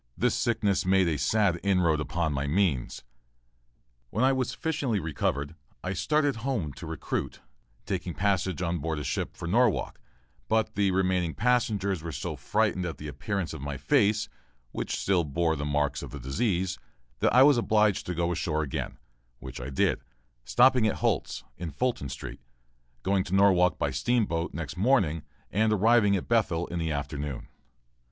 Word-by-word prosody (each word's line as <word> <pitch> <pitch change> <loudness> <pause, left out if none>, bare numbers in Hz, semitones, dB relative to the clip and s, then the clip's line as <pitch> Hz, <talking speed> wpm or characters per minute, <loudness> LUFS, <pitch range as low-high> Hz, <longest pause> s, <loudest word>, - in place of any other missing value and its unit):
This - - +2
sickness 105 -4 +1
made 95 -1 +3
a 80 -4 0
sad 90 +4 +2
inroad 90 -6 +2
upon 80 +1 -1
my 70 +1 -2
means. 80 -6 0 1.1
When 110 - 0
I 135 - +4
was 130 -2 0
sufficiently 135 -5 -1
recovered, 70 -2 -2 0.3
I 95 - -2
started 145 - +1
for 115 - -9
home 110 - -2
to - - -9
recruit, - - -4 0.5
taking 90 -2 -3
passage 95 -3 0
on 85 0 -1
board 80 +1 -2
a 75 - -4
sloop - - -3
for 85 - -5
Norwalk, 115 +3 +1 0.5
but 110 0 +1
the 100 -2 +2
remaining 90 -3 +1
passengers 105 -6 +1
were 85 0 -5
so - - -4
frightened 90 - 0
at 85 -2 -4
the 75 - -7
appearance 85 - -3
of 80 - -7
my 70 0 -4
face, 105 - +2 0.4
which - - -3
still 95 -3 +1
bore 80 +2 0
the 75 -1 -3
marks 75 -1 0
of - - -7
the 70 - -8
disease, 90 - -1 0.4
that - - +3
I 130 - +8
was 140 -3 +6
obliged 105 -3 +2
to 90 - -2
go 85 +1 0
ashore 80 -2 -1
again, 70 - -4 0.4
which 65 0 -8
I 65 - -5
did, 65 - +1 0.4
stopping 125 - +4
at - - 0
Holt's, - - -1
in 85 -1 -5
Fulton 75 - -2
Street, - - -7 0.6
going 95 -1 +2
to 95 - -1
Norwalk 95 -2 +4
by 70 - -1
steamboat 85 - 0
next 80 -1 -6
morning, 95 - +2 0.3
and 110 +2 +2
arriving 105 0 +4
at 95 - -3
Bethel 95 -8 +1
in 85 - -4
the 80 -1 -1
afternoon. 70 -1 -4
90 Hz, 170 wpm, -28 LUFS, 75-105 Hz, 1.1 s, I